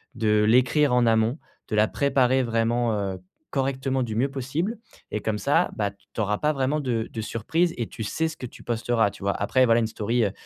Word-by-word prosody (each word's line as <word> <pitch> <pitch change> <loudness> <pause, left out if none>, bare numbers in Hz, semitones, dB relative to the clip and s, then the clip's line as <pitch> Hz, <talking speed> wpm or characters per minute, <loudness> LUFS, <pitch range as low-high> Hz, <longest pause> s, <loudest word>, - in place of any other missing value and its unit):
de 105 -2 +2
l'écrire 125 +4 +4
en 125 -1 +4
amont, 115 +4 +2 0.3
de 110 - -2
la 105 0 +3
préparer 130 -2 +2
vraiment, 115 0 +1
heu, 95 -2 -3 0.3
correctement 135 -1 -1
du 110 -3 -4
mieux 130 +5 +1
possible 145 - -2 0.3
et 105 - -3
comme 105 0 -1
ça, 155 +9 +2
bah, 105 -2 0
t 100 - -27 0.2
tu - - -6
auras 105 0 0
pas 150 - +1
vraiment 140 +2 0
de 120 -5 -1
de 110 - -4
surprise 160 - 0
et 120 -2 -2
tu 110 - -7
sais 160 +9 -1
ce 160 - -6
que - - -6
tu 120 - -11
posteras, 115 -2 +1
tu 100 - -12
vois? 100 - +2
Après 130 +6 +2
voilà, 115 -1 +4
une 115 - +1
story, 115 +2 0
heu, 100 - -1
120 Hz, 225 wpm, -25 LUFS, 110-135 Hz, 0.3 s, l'écrire